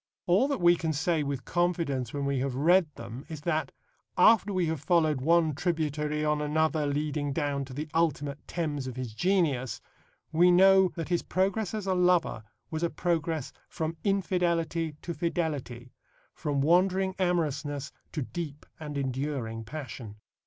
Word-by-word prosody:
All 190 +10 +4
that 280 -5 -1
we 175 0 +6
can 160 -2 -2
say 160 +2 +1
with 140 -4 -3
confidence 165 -8 0
when 140 -1 -3
we 140 -1 0
have 135 -1 -2
read 170 +5 +4
them 120 +3 -8
is 155 -2 -7
that, 160 -1 -1 0.5
after 220 -2 +5
we 185 -3 +1
have 160 -3 -2
followed 155 -4 +2
one 165 +1 +3
tributary 150 -2 -1
on 150 0 +1
another 155 0 +1
leading 145 0 -1
down 140 -2 -1
to 130 - -10
the 150 +2 -4
ultimate 150 -3 0
Thames 150 -6 -3
of 130 - -6
his 125 -4 -5
genius, 150 - +1 0.5
we 170 +3 +5
know 190 +1 +6
that 165 -1 -4
his 175 -1 +1
progress 195 +2 -1
as 210 -2 -4
a 190 - +1
lover 180 -10 +2 0.3
was 160 0 -3
a 170 - +1
progress 165 -5 -1 0.2
from 160 +1 -3
infidelity 170 -5 0
to 170 - -4
fidelity, 145 -8 -3 0.4
from 145 -2 -1
wandering 185 +4 +3
amorousness 150 -6 -1 0.2
to 150 - -2
deep 150 0 -6
and 150 -2 -5
enduring 130 -4 -3
passion. 120 -4 -7
155 Hz, 160 wpm, -28 LUFS, 140-175 Hz, 0.5 s, we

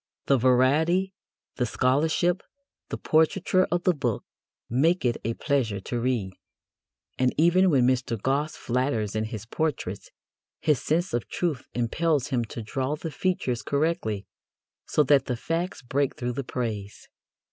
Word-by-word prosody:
The 135 -2 +3
variety, 150 +10 +3 0.4
the 125 - +1
scholarship, 160 +10 +2 0.5
the - - -3
portraiture 170 +4 +2
of 175 0 +1
the 180 - +4
book 125 -8 -2 0.4
make 160 +7 +2
it 120 -1 +2
a 115 +1 -1
pleasure 125 -9 0
to 120 +5 -3
read; 115 -6 -1 0.9
and, 130 0 +3
even 180 +4 +5
when 135 -6 +4
Mr. 125 -3 +1
Gosse 140 +7 0
flatters 120 -4 -1
in 110 0 0
his 110 -2 -6
portraits, 120 - -3 0.5
his 150 -5 +2
sense 170 +5 0
of 120 - -2
truth 160 -8 -2
impels 145 +4 +1
him 125 -4 +1
to 115 +1 -7
draw 130 +6 -2
the 160 +1 -6
features 145 -9 -1
correctly, 140 - -1 0.6
so 150 - +3
that 140 0 +4
the 125 - -2
facts 165 +4 -3
break 135 +2 0
through 125 0 -3
the 140 +3 -3
praise. 110 -5 -4
130 Hz, 145 wpm, -26 LUFS, 120-160 Hz, 0.9 s, even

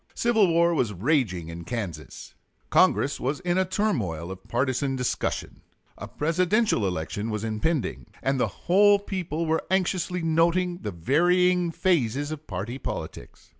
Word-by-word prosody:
Civil 225 -4 +3
war 170 0 +3
was 120 -9 0
raging 100 - 0
in 85 +1 -7
Kansas; 90 -8 -6 0.4
Congress 140 - +3
was 140 +3 -2
in 180 0 0
a 190 - +2
turmoil 115 - -1
of 95 0 -10
partisan 130 +2 0
discussion; 125 -1 -3 0.3
a - - -8
Presidential 180 - +1
election 95 +5 -3
was 105 -1 -3
impending, 110 - -2 0.2
and 135 0 +1
the - - +2 0.2
whole 205 +3 +6
people 180 -5 -3
were 160 0 0
anxiously 180 -1 0
noting 170 +2 +2
the - - -4
varying 175 - +2
phases 145 - 0
of 155 0 -7
party 105 +7 -5
politics. - - -7
150 Hz, 140 wpm, -26 LUFS, 110-180 Hz, 0.4 s, whole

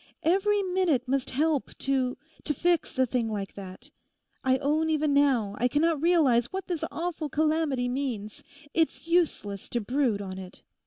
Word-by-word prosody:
Every 395 +4 +2
minute 360 -9 +1
must 270 0 0
help 295 +1 0
to—to 275 +4 -2
fix 345 -1 0
a 260 - +4
thing 240 -2 -1
like 200 -2 -4
that. 190 -2 -10 0.5
I 260 0 +3
own 305 +4 +1
even 305 -2 +1
now 260 -8 +3
I 245 - +3
cannot 300 +3 +1
realise 305 -9 +4
what 380 +6 -5
this 345 -4 -3
awful 330 -2 -3
calamity 305 -4 +1
means. 245 -5 -4 0.3
It's 325 -1 0
useless 325 - 0
to 240 - -1
brood 245 -1 0
on 190 -2 -6
it. 185 0 -11
280 Hz, 155 wpm, -27 LUFS, 245-320 Hz, 0.5 s, a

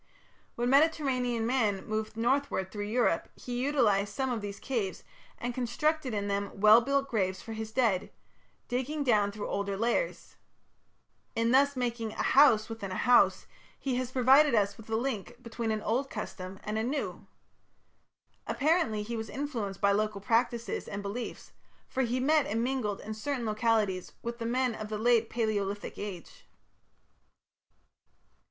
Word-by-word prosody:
When 240 +1 -1
Mediterranean 265 -6 +2
man 225 -6 +1
moved 215 0 -3
northward 240 -5 0
through 205 -1 -4
Europe, 225 -6 +1
he 245 0 -4
utilized 210 -8 +2
some 265 -1 -1
of 230 -3 -2
these 200 -1 -6
caves, 225 -8 -3 0.3
and 245 0 -3
constructed 260 +4 0
in 205 -2 -2
them 200 0 -3
well 215 +3 +8
built 275 +2 0
graves 190 -6 -1
for 225 - -7
his 220 0 -5
dead, 225 -6 +1 0.6
digging 265 +5 -2
down 210 -6 +3
through 205 0 -5
older 200 -1 -2
layers. 240 - -1 1.0
In 230 +1 +2
thus 280 +2 +4
making 235 -3 -2
a - - -2
"house" 260 -6 +5
within 225 -4 -6
a - - -3
"house", 245 -1 +4 0.3
he 260 -3 -1
has 255 -1 -2
provided 265 +2 +5
us 200 -2 +2
with 220 +1 -14
a 220 - 0
link 240 -2 -2
between 230 -1 -4
an 215 -1 -1
old 260 +5 0
custom 185 0 -6
and 215 +1 -2
a - - 0
new. 275 +5 -3 1.2
Apparently 280 -8 +1
he 235 +3 -5
was 220 -1 -4
influenced 235 -9 -4
by 200 - +4
local 210 0 0
practices 230 0 0
and 200 0 -5
beliefs, 210 +5 -6 0.4
for 265 - -2
he 245 0 0
met 295 +3 +3
and 225 +2 -1
mingled 245 -6 -1
in 215 - -5
certain 245 +3 -3
localities 215 -4 0
with 235 +1 -5
the 230 - -2
men 250 0 +1
of 215 -1 -6
the 215 - -3
Late 230 0 +3
Palaeolithic 205 -3 -2
Age. 195 -4 -8
230 Hz, 160 wpm, -30 LUFS, 210-255 Hz, 1.2 s, well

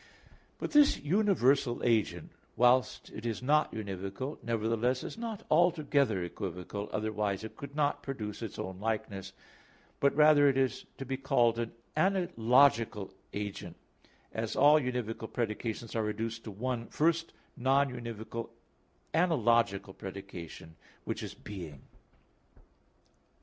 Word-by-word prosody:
But - - -4
this 295 -2 +6
universal 145 - +2
agent, 105 -8 +1 0.2
whilst 125 +2 +3
it 110 - -8
is 115 +1 -3
not 150 +3 +3
univocal, 100 +6 -5
nevertheless 115 +2 0
is - - -6
not 225 -3 -5
altogether 150 - +3
equivocal, 90 +3 -5
otherwise 105 -2 -1
it 110 - -8
could 140 0 -9
not 145 -1 +1
produce 110 -8 -5
its 110 -4 -6
own 95 0 -5
likeness, 100 -3 -3 0.7
but 140 - +3
rather 150 -1 +6
it 135 - +1
is 130 -1 0
to 135 - -6
be 135 +1 -2
called 120 -4 +2
an 115 -1 -2 0.2
analogical 135 - +3 0.2
agent, 105 -1 -5 0.6
as - - -3
all 150 +2 +7
univocal 120 -3 -3
predications 115 0 -3
are 115 - +2
reduced 110 +2 -3
to - - -5
one 115 +3 -3
first 165 +1 +1 0.2
non 135 +1 +2
univocal 115 -1 -6 0.6
analogical 115 - +2
predication, 90 -5 -9 0.3
which - - -3
is - - -6
being. 85 -8 -8
115 Hz, 125 wpm, -31 LUFS, 105-140 Hz, 0.7 s, all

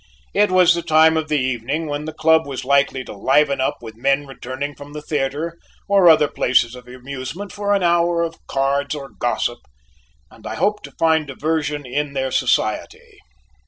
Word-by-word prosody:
It 210 0 +3
was 185 -1 +5
the 170 - -2
time 160 -1 +4
of 160 -1 -1
the 150 -1 +1
evening 130 +4 -2
when 145 0 -4
the 155 - -4
club 160 0 +3
was 135 -2 -5
likely 140 -1 +2
to - - -9
liven 140 +5 +2
up 130 - -2
with 110 -1 -8
men 135 +4 +1
returning 135 +1 -6
from 145 +1 -12
the 150 - -6
theatre 150 +3 -3 0.3
or 195 -3 +5
other 155 -2 +5
places 120 -3 +1
of 125 -1 -12
amusement 130 +9 -7
for 205 0 0
an 195 - 0
hour 170 0 +2
of 165 -1 -5
cards 140 +2 0
or 140 -2 -8
gossip, - - -2 0.7
and - - -12
I - - -4
hoped 210 +1 0
to - - -11
find 160 -2 +2
diversion 150 +1 -2
in 140 +3 -3
their 130 -1 -2
society. 450 - -1
150 Hz, 185 wpm, -20 LUFS, 135-165 Hz, 0.7 s, was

